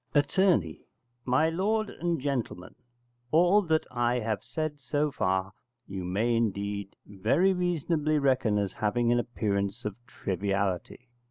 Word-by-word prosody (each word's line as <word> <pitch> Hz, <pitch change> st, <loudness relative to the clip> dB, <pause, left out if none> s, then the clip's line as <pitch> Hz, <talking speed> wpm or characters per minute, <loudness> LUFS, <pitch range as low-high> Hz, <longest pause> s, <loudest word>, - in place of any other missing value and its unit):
Att. 145 Hz, 0 st, +2 dB, 0.9 s
My 130 Hz, +5 st, +3 dB
lord 210 Hz, +5 st, 0 dB
and 170 Hz, -2 st, -2 dB
gentlemen 130 Hz, -9 st, -3 dB, 0.6 s
all 175 Hz, +7 st, +5 dB
that 160 Hz, -4 st, +1 dB
I 120 Hz, -1 st, +1 dB
have 110 Hz, -3 st, -2 dB
said 155 Hz, -2 st, -4 dB
so 145 Hz, +3 st, -1 dB
far 95 Hz, -5 st, -1 dB, 0.3 s
you 95 Hz, -1 st, -5 dB
may 105 Hz, +7 st, 0 dB
indeed 100 Hz, -3 st, -2 dB
very 120 Hz, -, +2 dB
reasonably 165 Hz, -4 st, 0 dB
reckon 130 Hz, -7 st, +2 dB
as 100 Hz, -2 st, -1 dB
having 115 Hz, +3 st, +1 dB
an 120 Hz, -, +3 dB
appearance 100 Hz, -5 st, -2 dB
of 105 Hz, -2 st, -3 dB
triviality. 100 Hz, +1 st, -2 dB
120 Hz, 125 wpm, -28 LUFS, 100-155 Hz, 0.9 s, all